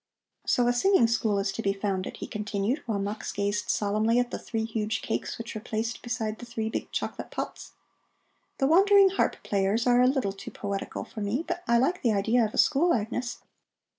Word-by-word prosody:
So 245 - +3
a 245 - +3
singing 380 +1 +4
school 225 -2 +1
is 195 0 0
to 225 - -4
be 195 -2 +1
founded," 195 -2 -3
he - - -5
continued, 210 +6 -2
while 220 -3 0
Mux 205 +2 -3
gazed 205 +1 -1
solemnly 215 +3 +2
at 245 0 +1
the - - -4
three 225 -1 -3
huge 220 -1 -2
cakes - - -3
which 230 0 -6
were 215 - -5
placed 225 +2 -3
beside 225 -2 -3
the 240 - -8
three 225 -2 -3
big - - -4
chocolate - - -4
pots. - - -6 0.8
"The 270 - +1
wandering 390 +5 +6
harp 385 - +1
players 200 +3 +1
are 245 0 +5
a 250 - +5
little 255 -7 +1
too 200 +5 -9
poetical 200 -3 -4
for 215 - -8
me, 225 +11 -1
but 350 0 -2
I 235 0 +4
like 340 +10 +1
the 230 -3 +2
idea 220 +4 +2
of 215 - -2
a - - -5
school, 330 +5 +4
Agnes. 240 +2 -3
225 Hz, 205 wpm, -27 LUFS, 205-245 Hz, 0.8 s, wandering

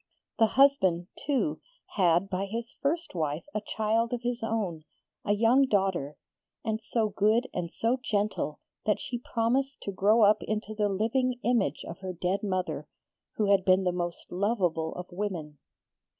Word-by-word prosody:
The 225 - +6
husband, 190 -11 +4
too, 290 +1 -1 0.3
had 175 -1 +3
by 195 0 -2
his 230 +4 -5
first 330 +4 -1
wife 155 -2 -2
a 215 - -1
child 225 +2 0
of 240 -1 -3
his 240 0 -2
own, 210 -8 -2 0.4
a 205 - +2
young 235 +6 +4
daughter, 190 - 0 0.5
and 220 0 -1
so 220 0 0
good 215 +5 +2
and 170 -2 -3
so 235 +3 0
gentle 205 - -1 0.3
that 210 - +2
she 245 -3 -4
promised 255 +4 0
to 200 - -4
grow 210 +4 +4
up 210 +1 +5
into 215 0 -3
the 210 -1 +1
living 245 +5 0
image 225 - +1
of 170 - -7
her 190 -1 -5
dead 180 +3 -1
mother, 185 -2 -2 0.5
who 205 -2 +2
had 195 -2 +4
been 185 0 +4
the 180 - +2
most 175 -1 -4
lovable 180 -5 0
of 180 - -5
women. 175 -7 -4
210 Hz, 165 wpm, -29 LUFS, 185-230 Hz, 0.5 s, The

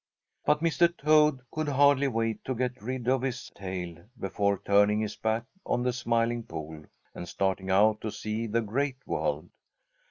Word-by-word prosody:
But 150 - +3
Mr. 170 +1 +3
Toad 150 -2 +4
could 155 -1 -2
hardly 140 0 +4
wait 115 -3 -1
to 130 - -2
get 125 -2 -2
rid 125 +2 -4
of 130 0 +3
his 130 -1 -4
tail 90 -3 -6 0.2
before 100 +1 0
turning 105 +1 +4
his 110 - -3
back 110 +1 -1 0.2
on 120 - 0
the 125 0 +1
Smiling 120 -1 0
Pool 80 -5 -8 0.3
and 90 - -7
starting 95 0 -1
out 105 +3 +4
to 110 - -3
see 110 +2 -3
the 115 +2 +1
Great 130 +5 -1
World. 75 +4 -2
115 Hz, 165 wpm, -28 LUFS, 100-130 Hz, 0.3 s, Toad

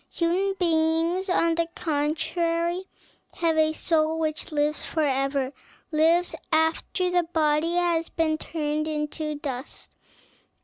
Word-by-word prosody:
Human 370 +4 +1
beings, 330 +1 +1
on 335 -2 +3
the 335 0 0
contrary, 335 +3 -1 0.5
have 330 -2 +1
a 315 0 +3
soul 320 0 +1
which 310 -1 -2
lives 295 0 0
forever, 275 -3 0 0.4
lives 330 +3 +3 0.2
after 320 +3 +1
the 355 0 +3
body 325 0 +1
has 340 -2 +1
been 315 -1 0
turned 300 -1 -2
to 305 -2 -3
dust. 275 -2 -6
320 Hz, 115 wpm, -25 LUFS, 305-335 Hz, 0.5 s, on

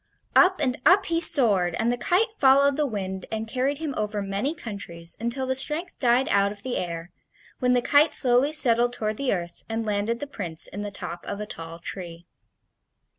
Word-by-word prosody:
Up 375 +1 +5
and 255 -4 -1
up 380 +3 +5
he 330 -1 0
soared, 205 - +4
and 230 +2 0
the - - 0
kite 385 - +1
followed 280 +1 +4
the 295 0 0
wind 190 -5 -5
and 220 0 -4
carried 260 +4 -1
him 305 -2 -4
over 210 0 -3
many 200 +10 -2
countries 175 - -6
until 235 +3 -3
the 260 - -1
strength 300 +7 +1
died 250 +1 +2
out 200 0 +2
of 205 -1 -12
the 255 -1 -3
air, 170 0 -5 0.5
when 250 -1 +2
the 245 -1 +1
kite 290 +4 +4
slowly 250 +3 +4
settled 240 -5 +3
toward 215 -2 -3
the 275 -2 -1
earth 170 -2 -4
and 225 0 -3
landed 210 +3 -1
the 290 - -4
Prince 180 - -1
in 205 - -7
the 205 - -4
top 175 -3 -8
of 200 - -5
a 210 - -4
tall 165 -4 -9
tree. 170 -1 -8
235 Hz, 200 wpm, -24 LUFS, 200-275 Hz, 0.5 s, Up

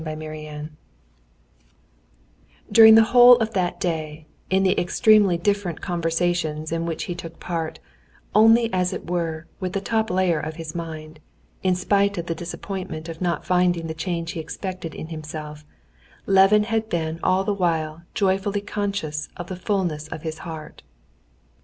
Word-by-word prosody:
Chapter 155 0 -6
18 150 0 -8 1.9
During 220 +1 +9
the 225 - +8
whole 245 +2 +8
of 225 -2 -2
that 180 -2 -1
day, 155 -3 -3 0.2
in 190 0 +2
the 190 +1 +3
extremely 200 0 +4
different 200 -2 -1
conversations 165 -3 -1
in 165 0 -2
which 165 -1 -3
he 175 - -4
took 165 -1 -9
part, 165 -2 -4 0.6
only 225 +1 +5
as 180 -1 +1
it - - -7
were 165 -2 -2
with 185 -1 -3
the 195 - 0
top 220 +2 -1
layer 180 -3 +1
of 155 +1 -5
his 160 -1 -7
mind, 155 -2 -7 0.4
in 185 -1 +2
spite 200 +2 +1
of 170 - -3
the 170 - -2
disappointment 175 -1 -6
of 165 +1 -8
not 175 -2 -1
finding 180 -2 +2
the 160 - -4
change 165 0 -3
he - - -6
expected 180 0 -6
in 155 - -7
himself, 155 -1 -7 0.6
Levin 195 +2 +5
had 220 0 -1
been 160 -1 -2
all 185 +1 +2
the 205 - 0
while 165 -4 -1
joyfully 195 +1 +1
conscious 200 -8 -3
of 175 0 -7
the 185 - -4
fulness 180 -5 -2
of 155 - -8
his 160 -1 -5
heart. 160 -2 -9
175 Hz, 160 wpm, -23 LUFS, 160-195 Hz, 1.9 s, During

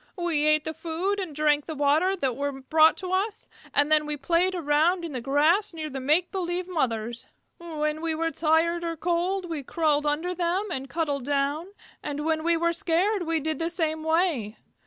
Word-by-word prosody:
We 330 -4 0
ate 305 -1 +4
the 315 - -4
food 350 +6 -2
and 355 -7 -5
drank 295 -1 +2
the 315 - -4
water 300 +7 +2
that 265 -9 -1
were 285 +2 -2
brought 315 +4 +4
to 370 -1 -5
us, 395 +3 -1 0.2
and 290 +1 +2
then 305 -1 +4
we 300 0 -3
played 345 +6 +1
around 335 +2 +2
in 330 - -6
the 255 -3 -4
grass 315 - +2
near 310 -2 -5
the 270 - -4
make 305 +7 +2
believe 360 -1 -2
mothers. 240 -9 -2 0.3
When 310 -2 -3
we 330 -1 -1
were 330 +1 -1
tired 330 +2 +1
or 335 -1 -3
cold 355 +3 -1
we 325 -4 -4
crawled 295 +1 0
under 320 +5 -1
them 360 +4 -1
and 270 -3 -4
cuddled 290 -5 -2
down, 285 +4 0 0.3
and 295 0 -4
when 315 -1 0
we 340 0 +2
were 340 +1 +1
scared 350 +3 0
we 325 -1 +1
did 310 -1 -2
the 330 0 -1
same 320 -2 -2
way. 320 - 0
320 Hz, 200 wpm, -26 LUFS, 295-345 Hz, 0.3 s, ate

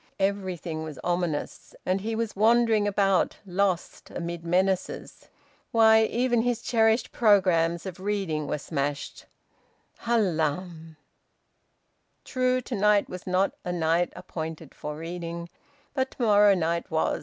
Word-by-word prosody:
Everything 190 -5 -2
was 155 -3 -7
ominous, 175 -4 -3
and 185 +1 0
he 225 +2 -3
wandering 225 0 +2
about, 195 -2 +2
lost, 185 -1 -1
amid 170 -1 -5
menaces... 185 +2 -1 0.4
Why, 220 -1 +6
even 240 0 +1
his 240 -1 -1
cherished 225 0 +2
programmes 180 -6 +3
of 185 -1 -7
reading 190 -7 -2
were - - -1
smashed... 145 -1 -4 0.7
Hallam!... 165 -6 -1 1.3
True, 255 -1 +1
to 250 - -7
night 210 -1 +3
was 180 0 -8
not 185 +2 +2
a 180 - -3
night 170 0 +1
appointed 160 -2 -7
for 150 0 -6
reading, 170 +1 -6 0.4
but 265 -1 0
to 255 - -5
morrow 205 -2 +5
night 170 -1 -1
was. 160 -1 0
185 Hz, 120 wpm, -26 LUFS, 165-215 Hz, 1.3 s, Why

